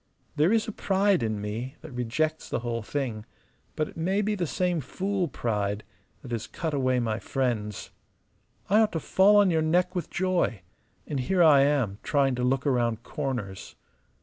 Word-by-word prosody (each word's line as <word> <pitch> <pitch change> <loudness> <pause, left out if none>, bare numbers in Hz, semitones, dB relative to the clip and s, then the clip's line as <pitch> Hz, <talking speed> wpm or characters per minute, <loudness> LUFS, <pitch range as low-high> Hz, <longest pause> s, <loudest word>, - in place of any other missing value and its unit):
There 155 +6 +3
is 225 0 +2
a - - -2
pride 195 -1 +2
in 110 -2 -1
me 110 +6 -5
that 160 - -10
rejects 130 +6 -2
the - - -2
whole 120 -1 -2
thing; 115 -2 -3 0.5
but 155 - 0
it - - -13
may 190 +5 +1
be 210 +1 0
the 180 -5 -1
same 180 0 0
fool 190 +6 -2
pride 105 -6 -2 0.4
that - - -9
has 115 -2 -3
cut 160 -2 -4
away 130 -2 +1
my 110 -2 -1
friends. 115 -7 -2 0.8
I 210 +3 +4
ought 220 -1 +3
to 165 - 0
fall 195 +6 +4
on 205 -3 +5
your 160 -1 +2
neck 175 +3 +2
with 180 -4 -3
joy: 175 - 0 0.4
and 145 - -3
here 175 +8 +2
I 145 -4 +7
am 135 -8 +1
trying 140 -2 +2
to 125 0 -2
look 130 +2 +1
round 120 -4 +1
corners! 125 -11 -5
140 Hz, 180 wpm, -27 LUFS, 120-180 Hz, 0.8 s, I